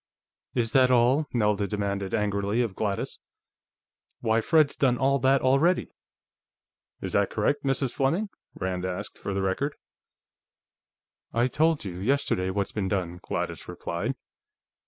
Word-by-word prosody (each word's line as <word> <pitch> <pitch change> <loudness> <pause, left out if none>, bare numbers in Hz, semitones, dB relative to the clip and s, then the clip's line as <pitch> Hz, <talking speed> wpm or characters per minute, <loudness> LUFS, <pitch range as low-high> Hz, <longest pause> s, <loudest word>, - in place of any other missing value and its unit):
"Is 115 -3 +1
that 130 -2 +5
all?" 130 +5 +4
Nelda 105 -3 +1
demanded 100 -1 -2
angrily 105 +2 0
of 110 -5 -3
Gladys. 100 0 -2 1.0
"Why 110 0 +2
Fred's 155 +1 +3
done 125 -3 +2
all 140 +1 +2
that 135 +2 +3
already!" 140 +8 +3 1.1
"Is - - -4
that - - +3
correct, 145 0 0
Mrs. 135 -2 +1
Fleming?" 165 +11 0 0.3
Rand 90 -1 -3
asked, 95 +2 -5
for 100 - -4
the 95 - 0
record. 135 +10 -1 1.6
"I 120 +1 +3
told 155 +1 +1
you, 90 -2 -5
yesterday, 105 -5 +1
what's 100 +1 -1
been 100 -3 -2
done," 90 -3 -2
Gladys - - -4
replied. 105 +10 -3
115 Hz, 135 wpm, -27 LUFS, 100-135 Hz, 1.6 s, that